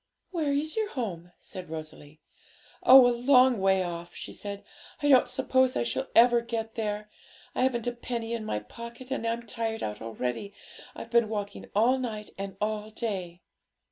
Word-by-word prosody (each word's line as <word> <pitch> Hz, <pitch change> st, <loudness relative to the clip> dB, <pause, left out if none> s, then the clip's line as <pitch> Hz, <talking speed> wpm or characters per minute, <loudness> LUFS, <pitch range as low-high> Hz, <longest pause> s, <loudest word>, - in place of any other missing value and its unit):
'Where 320 Hz, -6 st, 0 dB
is 295 Hz, +3 st, -1 dB
your 435 Hz, -2 st, 0 dB
home?' 180 Hz, -, -5 dB
said 185 Hz, -3 st, -9 dB
Rosalie. 155 Hz, -1 st, -8 dB, 0.6 s
'Oh, 260 Hz, 0 st, +9 dB
a 245 Hz, -, +4 dB
long 250 Hz, -1 st, +5 dB
way 190 Hz, -1 st, +3 dB
off.' 170 Hz, 0 st, -6 dB
she -, -, -7 dB
said. 200 Hz, 0 st, -6 dB, 0.4 s
'I 290 Hz, -, +3 dB
don't 260 Hz, -3 st, +6 dB
suppose 260 Hz, 0 st, +2 dB
I -, -, +1 dB
shall 120 Hz, 0 st, -2 dB
ever 240 Hz, 0 st, +7 dB
get 225 Hz, -1 st, -4 dB
there. 210 Hz, -2 st, -3 dB, 0.4 s
I -, -, -1 dB
haven't 250 Hz, -3 st, +1 dB
a 245 Hz, -, 0 dB
penny 235 Hz, -1 st, -4 dB
in 230 Hz, -2 st, -3 dB
my 105 Hz, -, -2 dB
pocket, 235 Hz, -, -10 dB
and 230 Hz, -4 st, -1 dB
I'm 230 Hz, +1 st, -2 dB
tired 225 Hz, -1 st, -3 dB
out 105 Hz, 0 st, -4 dB
already. 125 Hz, -, -4 dB, 0.4 s
I've 230 Hz, -, -8 dB
been 235 Hz, -2 st, +4 dB
walking 205 Hz, -2 st, -5 dB
all 245 Hz, +5 st, +4 dB
night, 215 Hz, -4 st, -5 dB
and 195 Hz, -1 st, -5 dB
all 215 Hz, 0 st, -2 dB
day.' 190 Hz, -6 st, -4 dB
225 Hz, 175 wpm, -28 LUFS, 195-245 Hz, 0.6 s, Oh